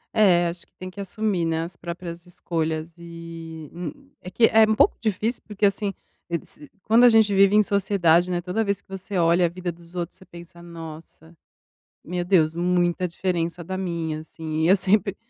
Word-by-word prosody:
É, 180 Hz, -5 st, +5 dB
acho 170 Hz, +1 st, -7 dB
que -, -, -42 dB
tem 185 Hz, 0 st, -7 dB
que 200 Hz, +2 st, -8 dB
assumir, 200 Hz, -2 st, -1 dB
né, 165 Hz, 0 st, 0 dB
as 170 Hz, +1 st, -8 dB
próprias 170 Hz, +1 st, -7 dB
escolhas 160 Hz, -2 st, -3 dB
e, 165 Hz, -2 st, -9 dB
hum, 275 Hz, +11 st, -8 dB
é 180 Hz, -, -8 dB
que, 225 Hz, +5 st, +4 dB
é 225 Hz, -, +5 dB
um 220 Hz, -, +3 dB
pouco -, -, +4 dB
difícil, 220 Hz, +2 st, -1 dB
porque 210 Hz, -1 st, -1 dB
assim, 200 Hz, 0 st, +1 dB, 0.4 s
e 170 Hz, -1 st, -1 dB
se, 295 Hz, -2 st, -10 dB
quando 230 Hz, +3 st, +5 dB
a 245 Hz, -, +9 dB
gente 220 Hz, -2 st, +4 dB
vive 195 Hz, +1 st, +5 dB
em 215 Hz, -, +6 dB
sociedade, 185 Hz, -4 st, +2 dB
né, 175 Hz, -1 st, 0 dB
toda 180 Hz, +5 st, -1 dB
vez 200 Hz, -2 st, -1 dB
que -, -, -21 dB
você 190 Hz, 0 st, -5 dB
olha 170 Hz, +1 st, +4 dB
a -, -, -4 dB
vida 180 Hz, +1 st, -4 dB
dos 170 Hz, +1 st, -17 dB
outros 175 Hz, 0 st, -4 dB
você 190 Hz, -, -14 dB
pensa 170 Hz, -1 st, -13 dB
nossa, 165 Hz, -1 st, -11 dB, 0.7 s
meu 175 Hz, +1 st, -3 dB
Deus, 165 Hz, -4 st, +3 dB
muita 175 Hz, +1 st, +1 dB
diferença 170 Hz, -1 st, -2 dB
da 185 Hz, +3 st, -5 dB
minha 170 Hz, -4 st, -3 dB
assim 160 Hz, 0 st, -5 dB
e -, -, +4 dB
eu 190 Hz, -, +6 dB
sempre 195 Hz, 0 st, +2 dB
175 Hz, 200 wpm, -24 LUFS, 170-200 Hz, 0.7 s, a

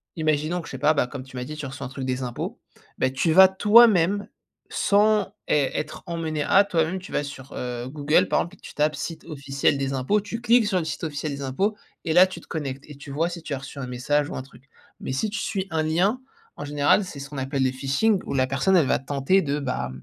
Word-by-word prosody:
imaginons 155 Hz, +2 st, 0 dB
que -, -, -12 dB
je -, -, -8 dB
sais, 135 Hz, -, -4 dB
bah, 150 Hz, +4 st, +3 dB
pas 135 Hz, -4 st, +1 dB
comme 130 Hz, +1 st, -7 dB
tu 130 Hz, 0 st, -14 dB
m'as 125 Hz, -, -3 dB
dit 155 Hz, +4 st, -7 dB
tu 150 Hz, -, -5 dB
reçois 135 Hz, -1 st, -6 dB
un -, -, -10 dB
truc 135 Hz, 0 st, -6 dB
des 130 Hz, 0 st, -2 dB
impôts, 120 Hz, -1 st, -5 dB, 0.4 s
bah, 130 Hz, -, +2 dB
tu 145 Hz, +5 st, 0 dB
vas 190 Hz, +2 st, +9 dB
toi-même 205 Hz, -1 st, +5 dB, 0.4 s
sans 210 Hz, 0 st, +2 dB, 0.2 s
ê 145 Hz, -3 st, +2 dB
être -, -, -4 dB
emmené 160 Hz, -3 st, -2 dB
à, 195 Hz, -, +5 dB
toi-même 170 Hz, 0 st, 0 dB
tu 185 Hz, -, -12 dB
vas -, -, 0 dB
sur, 140 Hz, -2 st, -9 dB
heu, 125 Hz, 0 st, -4 dB
Google 150 Hz, +2 st, +2 dB
par -, -, +2 dB
exemple 175 Hz, +3 st, -7 dB
et -, -, -28 dB
tu -, -, -12 dB
tapes 150 Hz, 0 st, +1 dB
«site 160 Hz, +3 st, -6 dB
officiel 140 Hz, -1 st, 0 dB
des 135 Hz, 0 st, -1 dB
impôts», 135 Hz, +11 st, +1 dB
tu 225 Hz, +3 st, -5 dB
cliques 240 Hz, -2 st, +4 dB
sur 190 Hz, -3 st, +1 dB
le 165 Hz, -, -3 dB
site 155 Hz, +1 st, -5 dB
officiel 150 Hz, 0 st, -3 dB
des 140 Hz, -, -8 dB
impôts 195 Hz, +11 st, 0 dB, 0.3 s
et 160 Hz, -, 0 dB
là 180 Hz, +2 st, +7 dB
tu 185 Hz, -, -8 dB
te -, -, -19 dB
connectes, 140 Hz, -3 st, -5 dB
et 150 Hz, -, -10 dB
tu 140 Hz, 0 st, -11 dB
vois 160 Hz, +4 st, 0 dB
si 170 Hz, -1 st, -7 dB
tu -, -, -4 dB
as -, -, -6 dB
reçu 135 Hz, +1 st, -9 dB
un 130 Hz, -, -4 dB
message 145 Hz, +4 st, 0 dB
ou -, -, -6 dB
un 130 Hz, -, -4 dB
truc. 135 Hz, 0 st, -18 dB, 0.3 s
Mais -, -, -4 dB
si 175 Hz, +11 st, -1 dB
tu 220 Hz, -, -3 dB
suis 195 Hz, -3 st, -2 dB
un 160 Hz, -1 st, +1 dB
lien, 190 Hz, +11 st, +1 dB, 0.4 s
en -, -, -6 dB
général 145 Hz, +7 st, +3 dB
c'est 150 Hz, -, -8 dB
ce 140 Hz, -, -7 dB
qu'on 145 Hz, -1 st, -6 dB
appelle 135 Hz, +1 st, -1 dB
le 130 Hz, -, +2 dB
phishing 140 Hz, +11 st, +1 dB
où -, -, -3 dB
la 130 Hz, -1 st, +3 dB
personne 135 Hz, +9 st, +2 dB
elle 160 Hz, -, +4 dB
va -, -, +2 dB
tenter 140 Hz, +7 st, +1 dB
de, 145 Hz, -3 st, -1 dB
bah, 125 Hz, -, -3 dB
150 Hz, 260 wpm, -24 LUFS, 135-180 Hz, 0.4 s, vas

